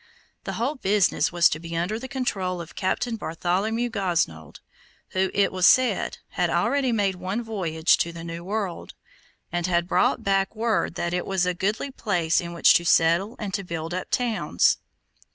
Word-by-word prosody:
The - - -3
whole 240 +6 -1
business 205 -4 +2
was 175 0 +5
to 155 - -3
be 165 0 -6
under 185 +6 -1
the 260 - -7
control 195 -9 -2
of 170 -1 -8
Captain 225 +4 -1
Bartholomew 210 +7 -1
Gosnold, 165 - -2 0.5
who, 190 0 0
it 200 -1 +2
was 185 -1 +3
said, 255 -1 +3
had - - 0
already 275 -3 +1
made 205 -4 +1
one 190 +6 -3
voyage 175 -7 +1
to 170 - 0
the 165 0 -9
new 165 0 -6
world, 195 -2 -4 0.6
and 175 0 -1
had 175 -1 +1
brought - - +2
back 195 +1 +1
word 220 -5 0
that 170 0 -2
it 180 - -2
was 190 -2 +1
a 180 - 0
goodly 210 +9 -2
place 175 -10 0
in 170 0 -6
which 170 - +5
to 170 - +3
settle 170 +7 +3
and 205 -3 -5
to 200 - -2
build 165 -1 -5
up 185 0 -4
towns. 240 -3 +1
185 Hz, 180 wpm, -25 LUFS, 170-215 Hz, 0.6 s, was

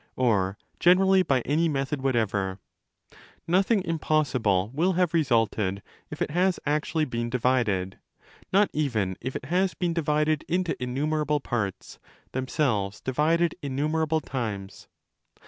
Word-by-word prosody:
or 100 -6 +1 0.2
generally 190 +2 +5
by 135 -8 +1
any 160 +7 +1
method 135 -1 -2
whatever: 105 -7 0 0.9
nothing 190 +4 +2
impossible 130 - +1
will 175 +6 +2
have 180 -2 +1
resulted 115 - +1 0.3
if - - -3
it - - -4
has 180 +3 +1
actually 155 +2 0
been 120 -3 -3
divided— 120 -7 0 0.5
not 200 +2 +4
even 110 -11 0
if 130 - -4
it - - -5
has 180 +5 +1
been 175 -2 -1
divided 155 -1 +1
into 180 -1 0
innumerable 150 +4 0
parts, 110 -8 -4 0.3
themselves 125 -7 -1
divided 160 +6 +1
innumerable 155 +3 0
times. 110 -8 -5
140 Hz, 120 wpm, -26 LUFS, 115-165 Hz, 0.9 s, generally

